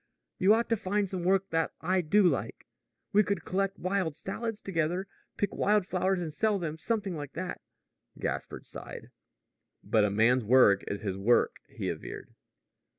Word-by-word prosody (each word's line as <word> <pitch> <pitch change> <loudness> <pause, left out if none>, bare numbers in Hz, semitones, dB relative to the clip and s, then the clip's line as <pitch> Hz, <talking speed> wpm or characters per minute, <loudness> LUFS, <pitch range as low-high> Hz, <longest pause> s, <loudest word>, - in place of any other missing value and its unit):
You 200 +4 +6
ought 230 +1 0
to 230 - +3
find 205 0 0
some 185 -2 -4
work 190 +1 +2
that 165 0 0
I 185 +3 +1
do 200 +6 +3
like. 180 - 0 0.5
We 210 - +6
could 200 0 -2
collect 195 +1 -1
wild 185 -4 -1
salads 225 +4 -4
together 175 0 -1 0.3
pick 205 - -1
wild 210 -2 +2
flowers 185 0 0
and 165 -3 -4
sell 215 +3 +1
them 165 -4 -3
something 200 +1 -2
like 145 -2 -7
that." 185 0 -5 0.6
Gaspard - - -4
sighed. - - -9 0.7
"But 110 - +3
a 105 - +3
man's 115 +5 +3
work 105 -4 +5
is 100 - -3
his 95 -3 -3
work," 115 +5 +3
he - - -5
averred. - - -6
185 Hz, 165 wpm, -29 LUFS, 155-200 Hz, 0.7 s, You